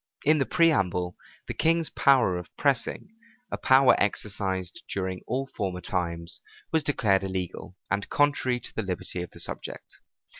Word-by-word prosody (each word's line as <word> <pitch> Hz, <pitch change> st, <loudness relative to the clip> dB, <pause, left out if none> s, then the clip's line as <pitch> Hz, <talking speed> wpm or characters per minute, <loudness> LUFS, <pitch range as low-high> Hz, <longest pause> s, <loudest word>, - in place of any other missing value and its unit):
In 155 Hz, +1 st, +4 dB
the 135 Hz, -, +1 dB
preamble, 90 Hz, -, +2 dB, 0.3 s
the -, -, -3 dB
king's 165 Hz, 0 st, +1 dB
power 130 Hz, -9 st, +4 dB
of 90 Hz, -1 st, -6 dB
pressing, 140 Hz, +6 st, 0 dB, 0.4 s
a -, -, -2 dB
power 130 Hz, 0 st, +6 dB
exercised 95 Hz, -3 st, -1 dB
during 95 Hz, -1 st, -2 dB
all 130 Hz, +3 st, -1 dB
former 95 Hz, -9 st, -4 dB
times, 85 Hz, -3 st, -2 dB, 0.3 s
was 160 Hz, -1 st, +2 dB
declared 105 Hz, -9 st, +2 dB
illegal, 95 Hz, -1 st, -4 dB, 0.2 s
and 100 Hz, 0 st, -1 dB
contrary 145 Hz, -4 st, +2 dB
to -, -, -6 dB
the -, -, 0 dB
liberty 90 Hz, -2 st, -4 dB
of 90 Hz, -, -6 dB
the -, -, -14 dB
subject. -, -, -6 dB
100 Hz, 150 wpm, -27 LUFS, 90-135 Hz, 0.4 s, power